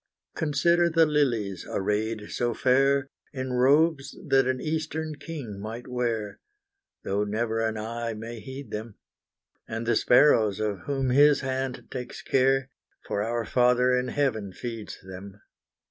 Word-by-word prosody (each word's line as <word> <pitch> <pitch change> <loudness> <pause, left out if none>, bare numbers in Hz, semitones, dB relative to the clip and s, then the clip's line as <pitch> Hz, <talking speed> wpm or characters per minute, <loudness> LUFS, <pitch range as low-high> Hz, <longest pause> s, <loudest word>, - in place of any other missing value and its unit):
Consider 170 +3 +2
the 165 0 +4
lilies, 120 - 0
arrayed 105 +2 -2
so 120 -2 -1
fair, 135 +1 +2 0.2
In 130 -2 -4
robes 140 +3 +3
that 135 -1 +4
an 130 0 0
eastern 160 0 -3
king 140 -10 -7
might 110 +4 -7
wear, 115 -4 -2 0.6
Though 100 +1 0
never 110 +2 -1
an 110 -1 -1
eye 115 +1 -4
may 115 +2 -7
heed 130 0 -9
them; 110 0 -6 0.7
And 115 +1 -4
the 120 - +2
sparrows, 115 -6 +4
of 105 -3 -1
whom 135 -2 0
His 145 +2 +5
hand 130 -1 -3
takes 125 -1 -6
care, 135 0 +2 0.3
For 100 - -2
our 115 +1 -1
Father 125 +1 +3
in 125 0 0
Heaven 110 -10 -1
feeds 115 -1 -6
them. 95 +2 -10
125 Hz, 140 wpm, -26 LUFS, 110-135 Hz, 0.7 s, His